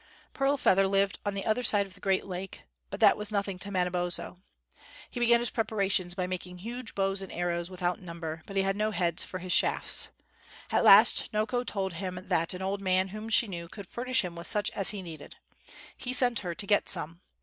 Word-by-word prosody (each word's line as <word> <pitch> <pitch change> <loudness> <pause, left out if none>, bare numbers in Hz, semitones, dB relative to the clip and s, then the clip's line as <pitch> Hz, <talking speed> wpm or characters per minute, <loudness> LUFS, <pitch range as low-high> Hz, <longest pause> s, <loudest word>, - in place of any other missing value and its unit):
Pearl 275 +1 +1
Feather 195 -6 +3
lived 195 0 0
on 200 - -2
the 195 - -4
other 220 +3 +1
side 205 -4 +4
of 195 - -15
the - - -16
great 190 -1 0
lake, 190 0 -7 0.3
but - - -7
that - - +6
was 210 0 0
nothing 200 -2 -2
to 200 - -7
Manabozho. 180 -1 -2 0.7
He 245 - -6
began 235 0 +4
his 240 - -1
preparations 195 -5 0
by 185 -2 -2
making 180 0 -6
huge 235 +5 -6
bows 195 0 0
and 195 - -8
arrows 175 0 -3
without 180 0 -3
number; 165 -2 -7
but 195 - -9
he 195 - +2
had 195 0 -1
no 215 +1 0
heads 175 -5 0
for 185 - -6
his 185 0 -3
shafts. - - +1 0.6
At - - +2
last - - +7
Noko 215 +3 -1
told 195 -6 -3
him 185 +1 -5
that 165 -1 0
an 185 - -6
old 195 +1 -3
man, 185 0 +1
whom 215 +3 -7
she 225 +1 +4
knew, 170 -3 -7
could 200 +3 -10
furnish 255 -1 -1
him 175 -1 -7
with 170 +1 -4
such 210 -1 +2
as 195 - +5
he 200 -2 -1
needed. 160 -4 -10 0.6
He 250 - -4
sent 245 -3 +5
her 175 -3 -5
to 200 - 0
get 205 0 +2
some. 170 0 0
195 Hz, 215 wpm, -28 LUFS, 180-210 Hz, 0.7 s, last